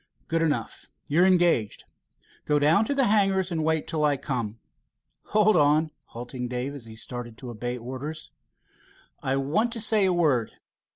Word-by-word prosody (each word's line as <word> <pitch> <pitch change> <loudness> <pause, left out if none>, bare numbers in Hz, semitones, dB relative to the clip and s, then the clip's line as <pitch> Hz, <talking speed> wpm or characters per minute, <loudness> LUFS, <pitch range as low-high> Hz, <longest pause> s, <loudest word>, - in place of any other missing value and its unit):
"Good 165 0 0
enough. 155 -3 -2 0.2
You're 170 +6 +3
engaged. 175 - +2 0.6
Go 150 - +2
down 155 +9 +4
to 285 - -1
the 275 - +3
hangars 195 -3 +2
and 160 -2 -1
wait 160 -1 0
till 155 -2 -1
I 145 -2 +2
come. 120 -6 -4 0.7
Hold 215 -1 +3
on," 155 0 +3
halting 125 +1 -6
Dave, 125 +3 -3
as 130 -5 -9
he 110 - -10
started 120 0 -7
to 125 -2 -8
obey 120 +2 -4
orders. 130 +6 -7 0.9
"I 135 - 0
want 155 - 0
to 235 - -4
say 215 -2 +3
a 185 - +3
word. 150 -10 +1
150 Hz, 165 wpm, -26 LUFS, 125-175 Hz, 0.9 s, down